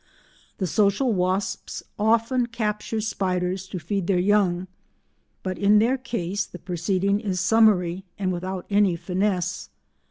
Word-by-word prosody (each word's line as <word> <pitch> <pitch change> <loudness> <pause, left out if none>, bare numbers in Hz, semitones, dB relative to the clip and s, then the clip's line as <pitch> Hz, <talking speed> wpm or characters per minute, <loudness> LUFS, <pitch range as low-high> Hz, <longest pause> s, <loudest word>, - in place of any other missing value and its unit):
The 190 - -1
social 205 - +2
wasps 190 +1 -2 0.2
often 230 +3 +2
capture 220 -1 -2
spiders 185 -3 -1
to 185 - -5
feed 180 +2 -2
their 195 - +2
young 185 -1 +2 0.8
but 185 -1 -3
in 205 +1 +5
their 235 +5 +3
case 205 -6 -2
the - - -10
proceeding 190 +3 0
is 195 -4 -2
summary 190 -3 +3
and 185 -2 -1
without 185 +1 -4
any 200 -3 +4
finesse. 180 - -1
195 Hz, 130 wpm, -24 LUFS, 180-210 Hz, 0.8 s, in